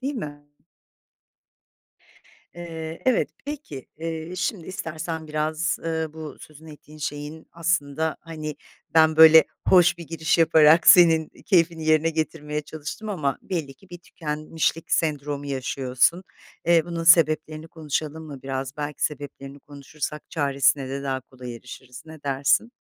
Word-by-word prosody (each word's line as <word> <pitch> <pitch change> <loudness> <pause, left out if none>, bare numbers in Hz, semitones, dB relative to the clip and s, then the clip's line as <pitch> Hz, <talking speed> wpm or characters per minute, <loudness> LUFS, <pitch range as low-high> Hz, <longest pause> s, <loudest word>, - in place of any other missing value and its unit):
değil 275 +2 -3
mi? 145 - -7 2.1
Eee, 165 -1 -7
evet, 255 - +3 0.2
peki, 265 - -7
eee, 165 +1 -5
şimdi 185 -1 -3
istersen 160 -2 -5
biraz, 155 +2 -1
ııı, 160 -1 -3
bu 155 -1 -8
sözünü 155 +1 -13
ettiğin 150 +1 -15
şeyin, 150 +2 -6
aslında, 160 -2 -1
hani, 155 -2 -7 0.4
ben, 160 -1 +5
böyle, 160 0 +9 0.2
hoş 175 -1 +5
bir 170 - -9
giriş 160 0 0
yaparak 160 0 +5
senin 165 -3 +7 0.2
keyfini 170 -4 +2
yerine 155 +1 +3
getirmeye 155 -2 -3
çalıştım 155 +8 -8
ama 150 -9 -1
belli 155 -7 -4
ki 195 +7 -22
bir 175 - -9
tükenmişlik 160 0 -3
sendromu 145 -2 -1
yaşıyorsun. 135 +5 0 0.4
Eee, 170 -1 +5
bunun 170 -1 -4
sebeplerini 155 -1 +4
konuşalım 155 0 -4
mı 145 -4 -10
biraz? 135 0 -4
Belki 150 0 -3
sebeplerini 140 -1 -5
konuşursak 145 +2 -7
çaresine 140 -3 +1
de 135 +1 -4
daha 135 -1 -2
kolay 125 -1 -10
erişiriz. 125 +1 -12
Ne 155 -2 -12
dersin? 140 - +1
155 Hz, 130 wpm, -24 LUFS, 145-165 Hz, 2.1 s, böyle